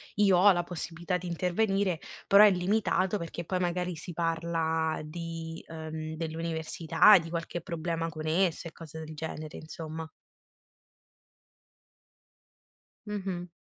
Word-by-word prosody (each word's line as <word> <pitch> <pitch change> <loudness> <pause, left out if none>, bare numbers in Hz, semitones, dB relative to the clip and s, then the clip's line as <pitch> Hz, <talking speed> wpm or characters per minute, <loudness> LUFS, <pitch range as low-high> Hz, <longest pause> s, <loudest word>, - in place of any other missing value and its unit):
io 200 -3 +5
ho 200 +3 +7
la 175 -1 0
possibilità 175 +1 -3
di 180 0 -7
intervenire, 185 +1 +1 0.3
però 200 +1 +8
è 205 - +7
limitato 190 +1 +1
perché 170 -1 -5
poi 185 +2 -1
magari 180 -1 -1
si 175 +2 -7
parla 165 -1 0
di 165 +1 -6
ehm, 160 -1 -6
dell'università, 165 +3 +3
di 165 -2 -4
qualche 170 +1 -3
problema 165 -1 -3
con 155 -1 -6
esse, 170 0 +1
e - - -20
cose 160 -1 -10
del 155 0 -8
genere 155 0 -6
insomma. 160 0 -7 3.0
Mh-mh. 190 -4 -3
170 Hz, 125 wpm, -29 LUFS, 160-180 Hz, 3.0 s, però